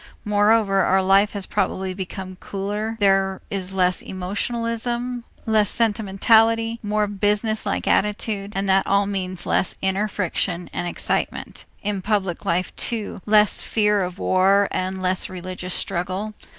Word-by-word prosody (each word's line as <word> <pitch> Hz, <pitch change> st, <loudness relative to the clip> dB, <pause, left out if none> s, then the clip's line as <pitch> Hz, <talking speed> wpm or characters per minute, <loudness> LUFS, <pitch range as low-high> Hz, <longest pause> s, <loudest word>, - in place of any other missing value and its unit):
Moreover 205 Hz, -1 st, +3 dB
our 190 Hz, +1 st, +3 dB
life 195 Hz, +2 st, +4 dB
has 200 Hz, -2 st, -2 dB
probably 190 Hz, 0 st, -1 dB
become 185 Hz, 0 st, -6 dB
cooler, 210 Hz, +3 st, -4 dB
there 195 Hz, -1 st, +2 dB
is 190 Hz, -2 st, -3 dB
less 180 Hz, -1 st, +2 dB
emotionalism, 230 Hz, +5 st, -3 dB, 0.2 s
less 215 Hz, -2 st, +3 dB
sentimentality, 225 Hz, +1 st, +2 dB
more 210 Hz, 0 st, 0 dB
business 210 Hz, +2 st, 0 dB
like 200 Hz, -, -2 dB
attitude, 210 Hz, -1 st, 0 dB
and 195 Hz, +1 st, -1 dB
that 195 Hz, 0 st, +3 dB
all 200 Hz, 0 st, +3 dB
means 185 Hz, -2 st, -3 dB
less -, -, +1 dB
inner 190 Hz, +2 st, 0 dB
friction 180 Hz, -2 st, -2 dB
and 175 Hz, -, -2 dB
excitement; -, -, -2 dB, 0.2 s
in 205 Hz, -1 st, -2 dB
public 195 Hz, -3 st, -1 dB
life 180 Hz, +2 st, -1 dB
too, 220 Hz, -4 st, -3 dB
less 210 Hz, -1 st, +4 dB
fear 210 Hz, -2 st, +1 dB
of 180 Hz, 0 st, -4 dB
war 195 Hz, +2 st, +3 dB
and 185 Hz, +1 st, -2 dB
less 185 Hz, 0 st, -1 dB
religious 185 Hz, 0 st, -4 dB
struggle. 190 Hz, +4 st, -1 dB
200 Hz, 135 wpm, -22 LUFS, 185-215 Hz, 0.2 s, life